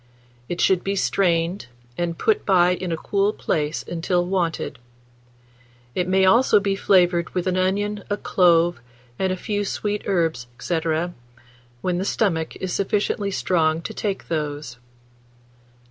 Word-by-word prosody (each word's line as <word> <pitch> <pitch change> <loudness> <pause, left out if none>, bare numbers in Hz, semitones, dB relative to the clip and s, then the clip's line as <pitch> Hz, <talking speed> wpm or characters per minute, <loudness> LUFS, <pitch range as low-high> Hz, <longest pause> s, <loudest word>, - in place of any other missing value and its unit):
It 175 - -3
should 185 -2 +3
be 195 +1 -1
strained, 175 -3 +1 0.3
and 170 +1 -2
put 435 -1 +1
by 180 -3 +4
in 180 -1 -4
a 165 - -1
cool 200 +4 +1
place 150 +1 -2
until 175 +1 0
wanted. 175 -7 -2 1.1
It 180 -1 -1
may 190 +1 +3
also 230 +2 +5
be 200 -1 0
flavoured 175 -4 +3
with 180 - 0
an 185 -1 0
onion, 200 +2 0
a 205 - 0
clove, 175 -6 +3 0.4
and 190 -1 +1
a 185 - -2
few 205 +2 -2
sweet 205 +1 -2
herbs, 165 -10 0
&c., 170 -2 -1 1.0
when 180 -1 -1
the - - -1
stomach 165 -7 0
is 185 -1 -4
sufficiently 200 0 0
strong 165 -4 +1
to - - -5
take 200 -2 -3
those. 145 -5 -4
180 Hz, 145 wpm, -23 LUFS, 170-195 Hz, 1.1 s, also